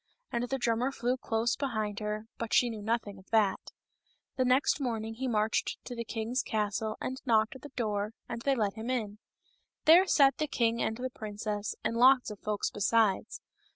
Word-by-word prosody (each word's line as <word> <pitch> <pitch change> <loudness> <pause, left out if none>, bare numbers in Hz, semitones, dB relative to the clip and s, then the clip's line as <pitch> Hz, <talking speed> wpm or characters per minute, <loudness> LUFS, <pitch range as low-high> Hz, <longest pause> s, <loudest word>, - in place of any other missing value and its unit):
And 240 +1 -2
the 270 - 0
drummer 240 +1 +1
flew 250 -1 0
close 235 -1 0
behind 215 -7 -2
her, 210 0 -3
but 230 -1 -1
she 245 -1 +4
knew 220 -2 -6
nothing 210 -2 -2
of 190 - -19
that. 215 -4 +3 0.8
The 260 - +2
next 255 +4 +3
morning 225 -3 -2
up - - -15
he 265 - -1
marched 215 -2 0
to 245 - -6
the 235 - -3
king's 230 +3 -2
castle 215 0 -2
and 260 +1 -4
knocked 225 -1 +2
at - - -21
the 290 - -9
door, 210 -2 -2
and 230 - -5
they 275 +2 +2
let 210 -5 0
him 225 +2 -6
in. 215 -5 -2 0.7
There 345 +5 +7
sat 275 -6 +5
the 305 - 0
king 235 -4 +1
and 220 - -1
the 255 +1 -4
princess, 210 -1 -4
and 230 - -1
lots 250 0 +5
of 210 - -9
folks 210 -1 -2
besides. 210 0 +1
225 Hz, 195 wpm, -30 LUFS, 215-250 Hz, 0.8 s, There